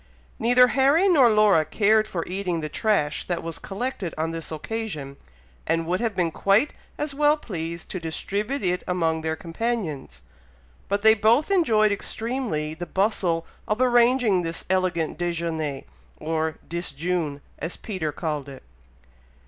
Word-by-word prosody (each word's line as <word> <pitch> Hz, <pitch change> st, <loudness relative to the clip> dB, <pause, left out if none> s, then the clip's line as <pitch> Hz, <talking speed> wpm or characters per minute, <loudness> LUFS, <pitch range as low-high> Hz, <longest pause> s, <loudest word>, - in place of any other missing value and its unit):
Neither 245 Hz, +2 st, +5 dB
Harry 280 Hz, +9 st, +4 dB
nor 285 Hz, -10 st, +6 dB
Laura 210 Hz, -6 st, +5 dB
cared 215 Hz, +5 st, +2 dB
for 170 Hz, -5 st, -3 dB
eating 185 Hz, -2 st, -2 dB
the 155 Hz, -, -4 dB
trash 155 Hz, -6 st, 0 dB
that 175 Hz, -2 st, -2 dB
was 165 Hz, 0 st, -5 dB
collected 200 Hz, -4 st, -4 dB
on 160 Hz, +1 st, -1 dB
this 165 Hz, -1 st, -6 dB
occasion, 155 Hz, -5 st, -5 dB, 0.5 s
and 165 Hz, +1 st, +1 dB
would 180 Hz, +3 st, 0 dB
have 230 Hz, -3 st, -1 dB
been 175 Hz, -3 st, +1 dB
quite 200 Hz, -, +2 dB, 0.2 s
as 295 Hz, -1 st, -2 dB
well 295 Hz, +1 st, +3 dB
pleased 170 Hz, -, -6 dB
to 185 Hz, -, -3 dB
distribute 200 Hz, -, -3 dB
it 180 Hz, -1 st, +1 dB
among 165 Hz, -3 st, 0 dB
their 160 Hz, 0 st, -1 dB
companions; 165 Hz, -, -4 dB, 0.6 s
but 200 Hz, +1 st, -1 dB
they 220 Hz, 0 st, +8 dB
both 225 Hz, -, +3 dB
enjoyed 220 Hz, -, +4 dB
extremely 215 Hz, -, -2 dB
the 175 Hz, +2 st, -6 dB
bustle 185 Hz, -4 st, 0 dB, 0.2 s
of 210 Hz, +2 st, 0 dB
arranging 240 Hz, -5 st, +4 dB
this 165 Hz, -1 st, -5 dB
elegant 175 Hz, -4 st, 0 dB
déjeuné 165 Hz, -5 st, -2 dB, 0.3 s
or 160 Hz, 0 st, -2 dB
"disjune," 165 Hz, -2 st, -2 dB, 0.2 s
as 165 Hz, +4 st, -4 dB
Peter 185 Hz, -8 st, -3 dB
called 150 Hz, -2 st, -4 dB
it. 135 Hz, -, -11 dB
180 Hz, 145 wpm, -24 LUFS, 160-225 Hz, 0.6 s, they